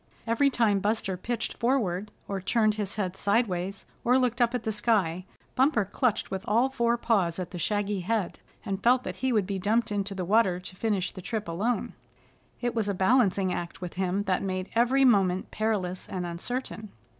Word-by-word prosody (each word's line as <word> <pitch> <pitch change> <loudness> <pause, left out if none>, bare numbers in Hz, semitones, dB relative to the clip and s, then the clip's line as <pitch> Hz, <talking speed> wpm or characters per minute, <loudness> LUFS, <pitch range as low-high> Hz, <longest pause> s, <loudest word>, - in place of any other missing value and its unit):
Every 240 +5 +3
time 220 -6 +2
Buster 205 -1 -1
pitched 230 +5 -4
forward, 210 -6 0 0.2
or 195 -1 -3
turned 215 +2 +2
his 210 -1 -4
head 190 -3 -2
sideways 200 -3 0 0.2
or 250 +2 +4
looked 250 -1 +1
up 240 +1 +3
at 245 - -2
the 220 - -1
sky, 200 -5 +1 0.3
Bumper 260 -5 +3
clutched 220 +1 0
with 190 -1 -3
all 235 +5 +3
four 235 -3 +1
paws 195 -8 +1
at 180 -2 -5
the 175 - -6
shaggy 205 +2 0
head, 200 +1 -2 0.3
and 195 -2 -3
felt 250 +1 +4
that - - -5
he 260 0 0
would 210 -5 +2
be 195 0 -3
dumped 220 +4 +1
into 200 -1 -2
the 185 -2 -3
water 195 -2 +3
to 185 +1 -10
finish 200 -3 -1
the 185 - -9
trip 220 0 -4
alone. 210 +9 -1 0.7
It 240 -1 -1
was 220 -3 0
a 200 - 0
balancing 190 -2 +3
act 170 -1 -5
with 180 -2 -6
him 190 +2 -1
that 190 -3 0
made 185 -1 -3
every 250 +4 +4
moment 190 -6 +3
perilous 195 -5 -2
and 180 -2 -3
uncertain. 215 +5 -4
205 Hz, 190 wpm, -28 LUFS, 185-235 Hz, 0.7 s, or